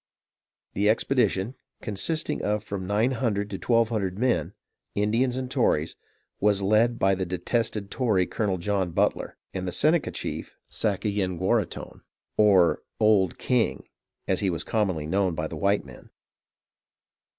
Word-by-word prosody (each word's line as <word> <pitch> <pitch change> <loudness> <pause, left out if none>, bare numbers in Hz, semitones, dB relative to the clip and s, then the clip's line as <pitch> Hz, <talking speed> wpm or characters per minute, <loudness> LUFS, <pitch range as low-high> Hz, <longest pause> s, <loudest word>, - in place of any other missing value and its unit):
The 105 +1 +2
expedition, 110 -2 +1 0.3
consisting 115 +10 -2
of 105 0 -1
from 95 -2 -5
nine 105 +6 +2
hundred 105 -5 -1
to 95 - -4
twelve 115 -2 +2
hundred 100 -5 -2
men, 125 +2 0 0.4
Indians 115 +5 +1
and 130 -1 -4
Tories, 85 - +1 0.4
was 100 -1 +2
led 110 +4 +3
by 95 -2 +3
the 95 0 -1
detested 100 +3 -2
Tory, 105 -8 +2
Colonel 100 -2 -1
John 95 -1 -1
Butler, - - 0 0.2
and 95 -1 -3
the - - -2
Seneca 155 - +2
chief - - -5
Sayenguaraghton, 100 -1 -1 0.3
or 95 -5 +4 0.2
"Old 105 -5 +3
King," 125 -3 0 0.4
as 95 - +1
he 100 - +1
was 85 -2 -2
commonly 95 -9 -1
known 95 +1 0
by 80 - -2
the - - -5
white 100 0 +1
men. - - -13
105 Hz, 140 wpm, -26 LUFS, 95-115 Hz, 0.4 s, or